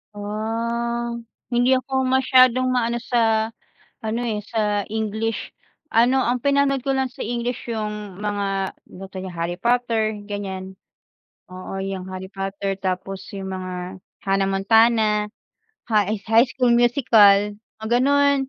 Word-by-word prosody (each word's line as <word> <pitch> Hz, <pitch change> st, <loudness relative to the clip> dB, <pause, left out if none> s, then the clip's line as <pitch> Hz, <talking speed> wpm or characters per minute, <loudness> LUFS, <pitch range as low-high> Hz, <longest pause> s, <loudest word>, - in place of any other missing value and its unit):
Ah. 235 Hz, +3 st, -2 dB, 0.4 s
Hindi 245 Hz, +2 st, +3 dB
ako 265 Hz, 0 st, -1 dB
masyadong 255 Hz, -1 st, +4 dB
ma-ano 240 Hz, -1 st, 0 dB
sa, 225 Hz, -2 st, +1 dB, 0.6 s
ano, 225 Hz, +2 st, -1 dB
eh, 215 Hz, -3 st, -1 dB
sa 210 Hz, -2 st, 0 dB
English. 220 Hz, +1 st, -3 dB, 0.4 s
Ano, 250 Hz, +3 st, +4 dB
ang 245 Hz, 0 st, 0 dB
pinanood 280 Hz, 0 st, +2 dB
ko 270 Hz, -, +1 dB
lang 265 Hz, -1 st, 0 dB
sa -, -, -17 dB
English 240 Hz, +1 st, -3 dB
yung 210 Hz, -3 st, -4 dB
mga 200 Hz, -2 st, -1 dB
ano -, -, -22 dB
ba'to 190 Hz, 0 st, -8 dB
ya 190 Hz, -, -6 dB
Harry 170 Hz, +1 st, -3 dB
Potter, 230 Hz, -3 st, +1 dB
ganyan. 190 Hz, -2 st, -5 dB, 0.8 s
Oo, 185 Hz, +1 st, -7 dB
yang 190 Hz, -1 st, -4 dB
Harry 185 Hz, 0 st, -7 dB
Potter, 195 Hz, 0 st, -3 dB
tapos 190 Hz, +1 st, -3 dB
yung 190 Hz, -1 st, -5 dB
mga 185 Hz, 0 st, -6 dB, 0.3 s
Hannah 195 Hz, 0 st, +1 dB
Montana, 215 Hz, +1 st, +3 dB, 0.6 s
High 210 Hz, -1 st, +1 dB
High 230 Hz, +3 st, +5 dB
School 250 Hz, -2 st, +2 dB
Musical, 210 Hz, -5 st, +5 dB, 0.2 s
mga 220 Hz, -, -5 dB
ganon 285 Hz, +1 st, +4 dB
220 Hz, 130 wpm, -22 LUFS, 195-240 Hz, 0.8 s, High